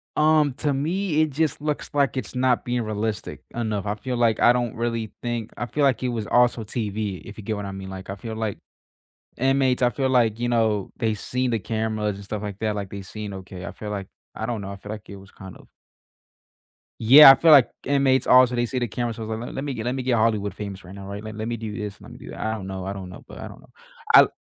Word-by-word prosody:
Um, 150 Hz, -3 st, +4 dB
to 145 Hz, -1 st, 0 dB
me, 160 Hz, +3 st, 0 dB
it 155 Hz, -, +2 dB
just 145 Hz, 0 st, -1 dB
looks 150 Hz, -1 st, -2 dB
like 140 Hz, -2 st, +1 dB
it's 130 Hz, -, -5 dB
not 125 Hz, -1 st, +2 dB
being 120 Hz, 0 st, 0 dB
realistic 110 Hz, -1 st, -3 dB
enough. 110 Hz, -4 st, -2 dB
I 105 Hz, +1 st, -1 dB
feel 125 Hz, +4 st, -4 dB
like 115 Hz, -2 st, +2 dB
I 120 Hz, -, +7 dB
don't 120 Hz, -2 st, -1 dB
really 115 Hz, -2 st, -2 dB
think 120 Hz, -2 st, -3 dB
I 120 Hz, -, -3 dB
feel 145 Hz, +5 st, -1 dB
like 135 Hz, -1 st, +2 dB
it 125 Hz, -, +1 dB
was 115 Hz, -3 st, -3 dB
also 120 Hz, -2 st, +3 dB
TV 105 Hz, -3 st, -3 dB
if 100 Hz, -, -11 dB
you 110 Hz, -, -8 dB
get 110 Hz, +1 st, -2 dB
what 105 Hz, -, -5 dB
I 100 Hz, -, -5 dB
mean, 95 Hz, 0 st, -7 dB
like 95 Hz, 0 st, -8 dB
I 95 Hz, -, -3 dB
feel 110 Hz, +2 st, -7 dB
like 110 Hz, -3 st, -3 dB, 0.8 s
inmates 130 Hz, 0 st, +2 dB
I 125 Hz, -, +5 dB
feel 135 Hz, +2 st, -1 dB
like, 115 Hz, -4 st, +2 dB
you 120 Hz, -, 0 dB
know, 110 Hz, -4 st, +1 dB
they've 110 Hz, -3 st, -1 dB
seen 125 Hz, -1 st, -1 dB
the 115 Hz, -, 0 dB
cameras 110 Hz, -1 st, -2 dB
and 100 Hz, -, -10 dB
stuff 105 Hz, +1 st, -5 dB
like 105 Hz, -2 st, -6 dB
that, 110 Hz, -1 st, 0 dB
like 100 Hz, -2 st, -4 dB
they 100 Hz, 0 st, -7 dB
seen 105 Hz, +1 st, -7 dB
okay 95 Hz, 0 st, -8 dB
I -, -, -5 dB
feel 105 Hz, -, -7 dB
like 100 Hz, -2 st, -4 dB, 0.3 s
I 110 Hz, -, -4 dB
don't 115 Hz, -3 st, -3 dB
know, 100 Hz, 0 st, -6 dB
I 100 Hz, -, -7 dB
feel 105 Hz, +1 st, -9 dB
like 105 Hz, -1 st, -10 dB
it 100 Hz, -, -8 dB
was 95 Hz, 0 st, -15 dB
kind 95 Hz, -1 st, -11 dB
of -, -, -19 dB, 1.3 s
Yeah, 135 Hz, +5 st, +11 dB
I -, -, +7 dB
feel 160 Hz, +4 st, +4 dB
like 140 Hz, -5 st, +8 dB, 0.2 s
inmates 135 Hz, -1 st, +2 dB
also, 125 Hz, -1 st, +6 dB
they 120 Hz, 0 st, +1 dB
see 130 Hz, -, -4 dB
the 120 Hz, -1 st, 0 dB
camera, 120 Hz, +1 st, -3 dB
so, 110 Hz, -, -7 dB
let 110 Hz, +2 st, -5 dB
let 135 Hz, -, -3 dB
me 140 Hz, -, -3 dB
get 115 Hz, -2 st, -5 dB
let 125 Hz, +2 st, -1 dB
me 130 Hz, -, -3 dB
get 125 Hz, -1 st, +2 dB
Hollywood 110 Hz, -2 st, +1 dB
famous 100 Hz, -2 st, -7 dB
right 90 Hz, +1 st, -11 dB
now, 100 Hz, -1 st, -9 dB
right? 100 Hz, +1 st, -6 dB
Let 110 Hz, 0 st, -7 dB
let 110 Hz, +1 st, -3 dB
me 120 Hz, -, -2 dB
do 110 Hz, -2 st, -6 dB
this, 105 Hz, -3 st, -6 dB
let -, -, -12 dB
me -, -, -11 dB
do -, -, -11 dB
that. -, -, -9 dB
I 110 Hz, -, -1 dB
don't 95 Hz, -3 st, -7 dB
know, 95 Hz, -1 st, -5 dB
I 95 Hz, -, -3 dB
don't 95 Hz, -2 st, -7 dB
know, 90 Hz, -, -11 dB
but -, -, -12 dB
I -, -, -7 dB
don't -, -, -13 dB
know. -, -, -20 dB, 0.4 s
I -, -, +9 dB
110 Hz, 270 wpm, -24 LUFS, 105-125 Hz, 1.3 s, Yeah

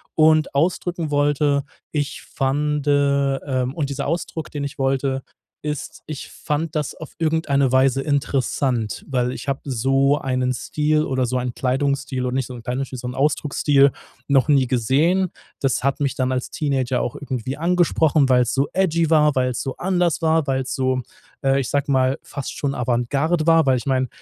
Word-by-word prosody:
Und 155 Hz, -1 st, +4 dB
ausdrücken 165 Hz, +1 st, 0 dB
wollte 145 Hz, 0 st, +2 dB, 0.3 s
ich 145 Hz, -2 st, -2 dB
fand, 145 Hz, +2 st, -1 dB
ähm 140 Hz, -2 st, +1 dB
und 150 Hz, -4 st, -2 dB
dieser 140 Hz, -, -3 dB
Ausdruck, 165 Hz, -1 st, -3 dB
den 145 Hz, -1 st, -4 dB
ich 140 Hz, 0 st, -7 dB
wollte, 135 Hz, 0 st, 0 dB, 0.4 s
ist, 150 Hz, -2 st, -5 dB
ich 150 Hz, -2 st, -7 dB
fand 155 Hz, +2 st, -3 dB
das 150 Hz, -2 st, -1 dB
auf 160 Hz, -, -10 dB
irgendeine 155 Hz, -5 st, +1 dB
Weise 130 Hz, 0 st, +3 dB
interessant, 130 Hz, -, -1 dB
weil 125 Hz, -2 st, 0 dB
ich 135 Hz, -, -7 dB
habe 135 Hz, -1 st, -1 dB
so 135 Hz, +2 st, +2 dB
einen 130 Hz, -1 st, 0 dB
Stil 150 Hz, +4 st, 0 dB
oder 130 Hz, -3 st, 0 dB
so 125 Hz, +1 st, -1 dB
einen 125 Hz, -1 st, -3 dB
Kleidungsstil 135 Hz, 0 st, -1 dB
oder 125 Hz, -, -2 dB
nicht 130 Hz, -2 st, 0 dB
so 125 Hz, -, -8 dB
'n 120 Hz, -, -8 dB
Kleidungsstil, 130 Hz, +1 st, -3 dB
so 125 Hz, -, -5 dB
'n 125 Hz, -, -5 dB
Ausdrucksstil 140 Hz, -1 st, +3 dB, 0.4 s
noch 140 Hz, 0 st, +3 dB
nie 135 Hz, -3 st, +4 dB
gesehen. 145 Hz, +10 st, +2 dB, 0.3 s
Das 135 Hz, -2 st, 0 dB
hat 140 Hz, +1 st, +1 dB
mich 140 Hz, -3 st, 0 dB
dann 130 Hz, -1 st, 0 dB
als 125 Hz, -1 st, -2 dB
Teenager 130 Hz, -4 st, 0 dB
auch 120 Hz, -, -3 dB
irgendwie 130 Hz, 0 st, -4 dB
angesprochen, 165 Hz, -4 st, +2 dB
weil's 125 Hz, -2 st, +3 dB
so 135 Hz, +1 st, +1 dB
edgy 170 Hz, -4 st, +2 dB
war, 150 Hz, -2 st, +4 dB
weil's 125 Hz, -2 st, 0 dB
so 135 Hz, -, -4 dB
anders 175 Hz, -4 st, 0 dB
war, 160 Hz, -2 st, +2 dB
weil's 130 Hz, -1 st, -1 dB
so, 130 Hz, -2 st, 0 dB, 0.4 s
äh, 135 Hz, 0 st, +3 dB
ich 130 Hz, -, -2 dB
sage 140 Hz, 0 st, 0 dB
mal, 130 Hz, 0 st, +2 dB
fast 140 Hz, -, -6 dB
schon 140 Hz, -1 st, -2 dB
Avantgarde 135 Hz, +7 st, 0 dB
war? 165 Hz, -1 st, +5 dB
Weil 130 Hz, -1 st, +3 dB
ich 125 Hz, -, -6 dB
meine, 130 Hz, -1 st, +1 dB
140 Hz, 175 wpm, -22 LUFS, 130-150 Hz, 0.4 s, war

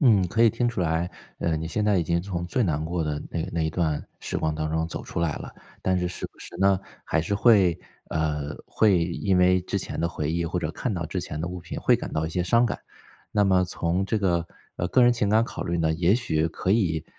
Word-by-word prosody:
嗯， 110 Hz, -, +5 dB
可 115 Hz, +5 st, +2 dB
以 115 Hz, -, +7 dB
听 120 Hz, +2 st, 0 dB
出 115 Hz, -5 st, -3 dB
来， 85 Hz, +1 st, 0 dB, 0.3 s
呃， 80 Hz, -2 st, 0 dB
你 80 Hz, -, -3 dB
现 105 Hz, +6 st, -1 dB
在 105 Hz, -2 st, +3 dB
已 -, -, +2 dB
经 85 Hz, +1 st, 0 dB
从 90 Hz, -2 st, -4 dB
最 125 Hz, +8 st, 0 dB
难 80 Hz, -6 st, 0 dB
过 85 Hz, +1 st, -1 dB
的 75 Hz, -1 st, -2 dB
那 85 Hz, -, -3 dB
那 85 Hz, -, 0 dB
一 80 Hz, -, 0 dB
段 80 Hz, -4 st, -1 dB, 0.2 s
时 -, -, -3 dB
光 80 Hz, -1 st, 0 dB
当 75 Hz, 0 st, -2 dB
中 80 Hz, +1 st, 0 dB
走 80 Hz, -, -5 dB
出 -, -, -4 dB
来 85 Hz, -3 st, +1 dB
了。 -, -, -8 dB, 0.3 s
但 95 Hz, -1 st, +2 dB
是 90 Hz, 0 st, -1 dB
时 -, -, -5 dB
不 -, -, -29 dB
时 -, -, -10 dB
呢， 95 Hz, -1 st, +4 dB, 0.3 s
还 80 Hz, -, +1 dB
是 100 Hz, +5 st, -1 dB
会 100 Hz, -6 st, +5 dB, 0.3 s
呃， 75 Hz, -2 st, -1 dB
会 105 Hz, -5 st, +3 dB
因 90 Hz, +2 st, 0 dB
为 90 Hz, 0 st, +5 dB
之 100 Hz, +2 st, -2 dB
前 -, -, -5 dB
的 85 Hz, -, +1 dB
回 75 Hz, -3 st, -3 dB
忆 85 Hz, +1 st, 0 dB
或 85 Hz, +2 st, -2 dB
者 80 Hz, -3 st, -2 dB
看 120 Hz, +6 st, -3 dB
到 85 Hz, -4 st, -3 dB
之 90 Hz, +3 st, -3 dB
前 75 Hz, -3 st, -5 dB
的 85 Hz, -, -2 dB
物 90 Hz, 0 st, -6 dB
品 85 Hz, -, -6 dB
会 -, -, +4 dB
感 -, -, -7 dB
到 80 Hz, +1 st, 0 dB
一 -, -, -5 dB
些 90 Hz, +2 st, 0 dB
伤 115 Hz, +6 st, +3 dB
感。 105 Hz, -, -3 dB, 0.5 s
那 105 Hz, -1 st, +3 dB
么 95 Hz, -1 st, +4 dB
从 90 Hz, +1 st, -1 dB
这 110 Hz, +3 st, 0 dB
个 85 Hz, -4 st, +1 dB, 0.3 s
呃， 90 Hz, -, -1 dB
个 125 Hz, -, +4 dB
人 120 Hz, 0 st, +6 dB
情 115 Hz, -4 st, 0 dB
感 110 Hz, +2 st, +4 dB
考 -, -, -5 dB
虑 85 Hz, 0 st, -1 dB
呢， 80 Hz, -1 st, +2 dB
也 85 Hz, +4 st, +3 dB
许 80 Hz, -10 st, 0 dB
可 90 Hz, -, -3 dB
以 85 Hz, -8 st, +2 dB
90 Hz, 280 characters per minute, -25 LUFS, 80-100 Hz, 0.5 s, 以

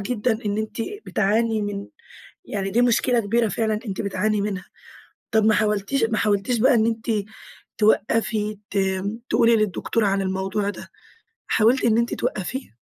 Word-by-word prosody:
جدًا 220 Hz, +1 st, -1 dB
إن 205 Hz, 0 st, -1 dB
أنتِ 215 Hz, 0 st, -4 dB, 0.3 s
بتعاني 215 Hz, +2 st, +1 dB
من 200 Hz, -1 st, -4 dB, 0.6 s
يعني 195 Hz, -1 st, -3 dB
دي 240 Hz, +4 st, +3 dB
مشكلة 245 Hz, 0 st, +3 dB
كبيرة 230 Hz, +2 st, +1 dB
فعلًا 215 Hz, +1 st, -1 dB
أنتِ 195 Hz, -3 st, -3 dB
بتعاني 205 Hz, +1 st, 0 dB
منها. 200 Hz, -2 st, -3 dB, 0.7 s
طب 220 Hz, -1 st, +3 dB
ما 220 Hz, 0 st, +5 dB
حاولتيش 210 Hz, +5 st, +1 dB
ما 225 Hz, -1 st, 0 dB
حاولتيش 210 Hz, +3 st, +1 dB
بقى 260 Hz, +3 st, +5 dB
إن 220 Hz, -1 st, +3 dB
أنتِ، 225 Hz, 0 st, -2 dB, 0.7 s
توقَّفي 215 Hz, 0 st, +1 dB
ت 200 Hz, -, -1 dB, 0.5 s
تقولي 230 Hz, 0 st, +4 dB
للدكتور 215 Hz, +2 st, 0 dB
عن 195 Hz, -1 st, +1 dB
الموضوع 190 Hz, +2 st, -1 dB
ده، -, -, -10 dB, 0.6 s
حاولتِ 235 Hz, +4 st, +3 dB
إن 225 Hz, -1 st, +3 dB
أنتِ 235 Hz, +1 st, +1 dB
توقَّفيه؟ 190 Hz, -, -4 dB
215 Hz, 150 wpm, -23 LUFS, 200-230 Hz, 0.7 s, ما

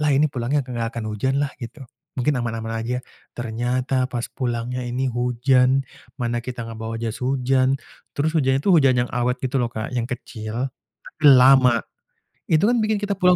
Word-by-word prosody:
lah 150 Hz, -, +2 dB
ini 145 Hz, -, +4 dB
pulangnya 130 Hz, +3 st, 0 dB
enggak 120 Hz, -2 st, -3 dB
akan 115 Hz, -, -3 dB
hujan 130 Hz, +6 st, 0 dB
lah 145 Hz, 0 st, 0 dB
gitu. 120 Hz, +4 st, -8 dB, 0.3 s
Mungkin 130 Hz, +3 st, +1 dB
aman-aman 115 Hz, -1 st, -3 dB
aja, 120 Hz, +2 st, -2 dB, 0.4 s
ternyata 125 Hz, +2 st, -1 dB
pas 120 Hz, -2 st, -3 dB
pulangnya 120 Hz, 0 st, -2 dB
ini 125 Hz, +2 st, -1 dB
hujan. 125 Hz, +2 st, +2 dB, 0.4 s
Mana 120 Hz, 0 st, -1 dB
kita 120 Hz, -1 st, -5 dB
nggak 115 Hz, -1 st, -8 dB
bawa 115 Hz, 0 st, -4 dB
jas 115 Hz, +1 st, -4 dB
hujan, 130 Hz, +1 st, +2 dB, 0.4 s
terus 155 Hz, +2 st, +1 dB
hujan 135 Hz, -4 st, +3 dB
itu 195 Hz, -, +4 dB
hujan 135 Hz, -7 st, +4 dB
yang -, -, -10 dB
awet 125 Hz, +1 st, +1 dB
gitu 130 Hz, +1 st, 0 dB
loh 120 Hz, -, 0 dB
Kak, 110 Hz, +1 st, -5 dB
yang 120 Hz, 0 st, -1 dB
kecil, 115 Hz, 0 st, -4 dB, 0.4 s
tapi -, -, -14 dB
lama. 130 Hz, -2 st, +7 dB, 0.7 s
Itu 160 Hz, +3 st, +3 dB
kan 245 Hz, -, +3 dB
bikin 215 Hz, 0 st, +1 dB
kita 205 Hz, -1 st, 0 dB
pulang 180 Hz, -1 st, +5 dB
125 Hz, 180 wpm, -22 LUFS, 120-135 Hz, 0.7 s, lama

